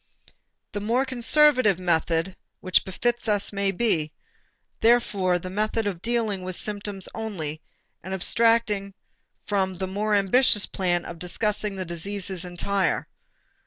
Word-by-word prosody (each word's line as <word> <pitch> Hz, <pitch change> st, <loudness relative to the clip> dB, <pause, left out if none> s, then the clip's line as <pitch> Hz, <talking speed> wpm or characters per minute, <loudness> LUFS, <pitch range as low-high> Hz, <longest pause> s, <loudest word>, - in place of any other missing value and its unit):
The 205 Hz, -, -4 dB
more 240 Hz, +6 st, +1 dB
conservative 255 Hz, -, +3 dB
method 170 Hz, 0 st, 0 dB, 0.2 s
which 185 Hz, -1 st, +2 dB
befits 240 Hz, +5 st, -1 dB
us 205 Hz, -1 st, +1 dB
may 200 Hz, 0 st, +1 dB
be, 175 Hz, -7 st, 0 dB, 0.7 s
therefore, 205 Hz, -6 st, +3 dB
the 185 Hz, +1 st, -7 dB
method 215 Hz, +2 st, -1 dB
of 190 Hz, -4 st, -3 dB
dealing 225 Hz, -4 st, -1 dB
with 185 Hz, 0 st, -4 dB
symptoms 205 Hz, -2 st, -2 dB
only 165 Hz, -9 st, -5 dB, 0.4 s
and 190 Hz, -, -8 dB
abstracting 205 Hz, 0 st, +2 dB, 0.5 s
from 190 Hz, -2 st, 0 dB
the 190 Hz, -, -2 dB
more 205 Hz, +3 st, -1 dB
ambitious 205 Hz, +2 st, +4 dB
plan 175 Hz, -2 st, -1 dB
of 170 Hz, -1 st, -8 dB
discussing 210 Hz, +3 st, -2 dB
the 185 Hz, -1 st, -4 dB
diseases 185 Hz, +2 st, -3 dB
entire. 180 Hz, +1 st, -1 dB
200 Hz, 125 wpm, -25 LUFS, 185-220 Hz, 0.7 s, ambitious